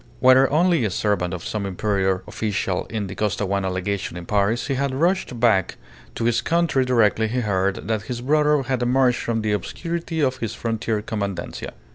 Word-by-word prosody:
Whether 130 +1 +6
only 170 -1 +3
a 110 - +1
servant 95 -2 0
or 90 - -4
some 105 +4 -3
inferior 95 -1 0
official 100 -3 -2
in 110 -2 -3
the 95 - -6
Costaguana 100 -2 -1
Legation 95 -1 -3
in 90 - -7
Paris, 105 +4 +1
he 140 - -1
had 135 0 -1
rushed 170 -5 0
back 110 -6 +3 0.4
to - - -3
his 120 0 +2
country 165 -5 +1
directly 115 -3 +2
he 125 +3 -1
heard 100 -2 -1
that 110 -2 0
his 120 +2 -5
brother 150 +1 +3
had 130 -1 -1
emerged 125 0 +3
from 115 -2 -2
the 105 - 0
obscurity 165 - -3
of 130 -3 +1
his 115 -2 -4
frontier 110 -2 -2
commandancia. 100 -5 -4
110 Hz, 180 wpm, -22 LUFS, 100-130 Hz, 0.4 s, Whether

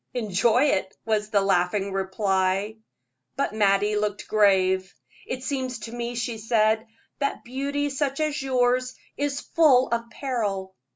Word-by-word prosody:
"Enjoy 225 +2 +2
it," 190 -9 0
was 215 -1 0
the 205 -2 +3
laughing 195 +1 +1
reply. 195 +1 0 0.6
But - - -1
Mattie 205 0 +2
looked 210 -1 -2
grave. 190 -3 +3 0.4
"It 255 0 -4
seems 260 -3 -2
to 225 - -7
me," 240 0 -4
she 235 -1 -3
said, 220 0 +2 0.3
"that 280 -1 -2
beauty 280 +3 -2
such 275 0 -2
as 305 -2 -1
yours 255 -1 +1 0.2
is 285 0 -2
full 275 -6 +4
of 235 0 -2
peril." 205 -8 -3
225 Hz, 135 wpm, -25 LUFS, 200-255 Hz, 0.6 s, full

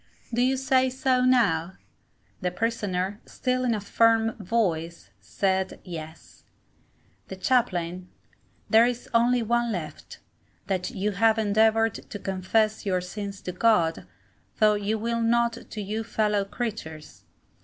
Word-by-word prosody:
Do 240 - +1
you 260 +1 +2
say 260 0 +2
so, 255 0 +1
now? 195 -9 +2 0.7
The 180 - 0
Prisoner, 200 -1 -2
still 255 -1 -1
in 240 -3 +1
a - - -2
firm 225 +2 +3
voice, 170 - -1
said, 190 - -1
Yes. 160 -3 -10 0.8
The 190 - -7
Chaplain. 185 -5 0 0.6
There 225 +1 +6
is 245 0 -4
only 240 +1 +3
one 235 +1 +1
left, 170 -7 -6 0.5
that 185 -2 -2
you 205 +2 -2
have 220 +3 +3
endeavoured 220 +1 +3 0.2
to - - -5
confess 205 +3 0
your 185 -3 0
sins 200 +2 -7
to 180 - -4
God, 180 -5 +2 0.5
though 215 -1 +5
you 205 +1 -1
will 230 +1 -1
not 235 +1 +2 0.2
to 215 - -5
you 215 +3 -3
fellow 210 -2 0
creatures. 195 -9 -6
215 Hz, 135 wpm, -26 LUFS, 185-230 Hz, 0.8 s, There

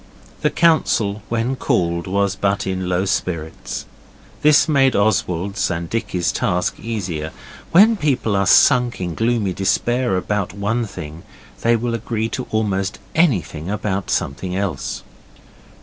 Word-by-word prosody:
The - - +3
council, 115 - +2
when 115 +3 0
called, 85 -7 0
was 100 +1 +1
in - - -15
but 100 0 +1
low 95 -1 -1
spirits. 80 -10 -3 0.6
This 150 +1 +5
made 135 -4 +3
Oswald's 100 -2 0
and 85 -1 -4
Dicky's 95 -6 -1
task 90 -2 -1
easier. 90 -9 -4 0.4
When 215 +6 +6
people 135 - 0
are 100 -1 +1
sunk 125 +3 +5
in 90 -2 -3
gloomy 115 -2 0
despair 120 +4 +1
about 100 0 -2
one 110 +4 -1
thing, 80 -3 -8 0.4
they 115 0 +3
will 115 +1 -1
agree 115 -1 -2
to - - -4
almost 100 -3 -1 0.2
anything 95 - +1
about 100 -2 -2
something 90 +7 -2
else. 100 -2 -3
100 Hz, 135 wpm, -20 LUFS, 90-115 Hz, 0.6 s, When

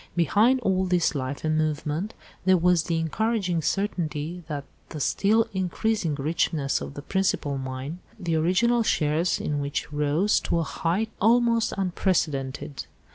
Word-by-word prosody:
Behind 210 - +3
all 190 -3 +1
this 180 -2 +2
life 135 -1 -4
and 155 0 +1
movement 155 +5 -1 0.3
there 185 0 +5
was 175 -1 +3
the 170 -2 0
encouraging 180 +1 0
certainty 170 -3 -2
of 145 -2 -3 0.3
the 155 - -6
still 215 +9 +2
increasing 190 -2 0
richness 145 -1 0
of 140 - -7
the 145 - -7
principal 160 -7 0
mine, 130 +5 -5 0.2
the 170 -4 -1
original 185 +9 +3
shares 160 -4 +1
in 145 -1 -2
which 145 +1 -3
rose 150 +7 +2
to - - -1
a 165 - +1
height 180 +8 -1
almost 230 +1 +3
unprecedented. 150 -8 -1
170 Hz, 140 wpm, -26 LUFS, 150-195 Hz, 0.3 s, there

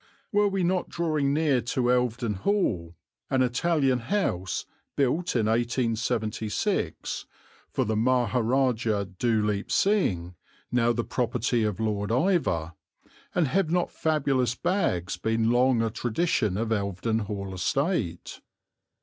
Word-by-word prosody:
Were 205 -1 +3
we 195 -2 0
not 180 +1 0
drawing 155 -5 0
near 145 -4 +2
to 120 +1 0
Elvedon 120 -4 0
Hall 95 - 0 0.3
an 130 -1 +3
Italian 135 0 +1
house 115 - -1 0.3
built 145 +6 0
in 115 -3 +2
1876 115 -2 -1 0.4
for - - -1
the 110 - -1
Maharajah 120 -2 +1
Dhuleep 105 -4 +1
Singh, 95 - +1 0.4
now 120 -1 +3
the 120 0 -1
property 120 -1 0
of 105 -2 -1
Lord 105 -2 -1
Iveagh 120 - +1 0.6
and 175 -4 +3
have 185 +2 +1
not 175 +1 0
fabulous 135 -6 +1
"bags" 100 - 0
been 115 0 +1
long 120 -1 +3
a 115 - -1
tradition 115 - 0
of 115 +1 -1
Elvedon 105 +1 -1
Hall 100 -2 -5
estate? 105 - -1
120 Hz, 120 wpm, -27 LUFS, 110-140 Hz, 0.6 s, Were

